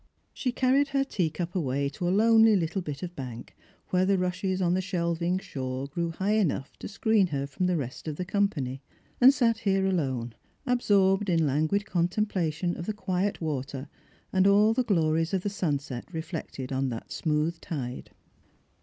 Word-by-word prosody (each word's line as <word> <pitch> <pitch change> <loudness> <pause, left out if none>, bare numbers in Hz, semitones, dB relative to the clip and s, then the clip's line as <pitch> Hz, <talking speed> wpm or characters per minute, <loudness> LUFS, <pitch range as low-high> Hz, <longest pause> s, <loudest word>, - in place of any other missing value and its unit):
She 255 - -1
carried 265 +3 +3
her 275 0 +1
teacup 175 - -2
away 140 -5 0
to 175 +5 -4
a - - +2
lonely 220 +2 +5
little 180 +1 0
bit 150 -3 -6
of 175 0 -6
bank 125 -3 -8 0.3
where 180 0 +2
the 195 +1 +3
rushes 185 +1 -1
on 175 -2 +2
the 185 - +1
shelving 175 -1 -1
shore 130 -6 -4
grew 170 +4 -2
high 195 +6 0
enough 150 -9 -1
to - - -6
screen 210 -1 +2
her 140 -4 -2
from 160 +6 -2
the 180 -1 +1
rest 130 +1 -5
of 155 - -3
the 180 - -4
company, 170 -10 -1 0.4
and 255 +2 +10
sat 230 -5 +2
here 195 -3 +1
alone, 130 -11 -1 0.3
absorbed 205 -5 +3
in 165 -2 +3
languid 155 +8 +1
contemplation 175 -2 0
of 170 - -6
the 215 - -1
quiet 195 -1 -1
water 140 -2 -4 0.4
and 190 0 +4
all 210 +2 +5
the 255 - +1
glories 165 -3 +1
of 185 - -1
the 205 - -1
sunset 145 -8 -3
reflected 160 -5 -5
on 135 0 0
that 115 -2 -7
smooth 160 +1 -1
tide. 130 -6 -5
175 Hz, 175 wpm, -28 LUFS, 150-200 Hz, 0.4 s, and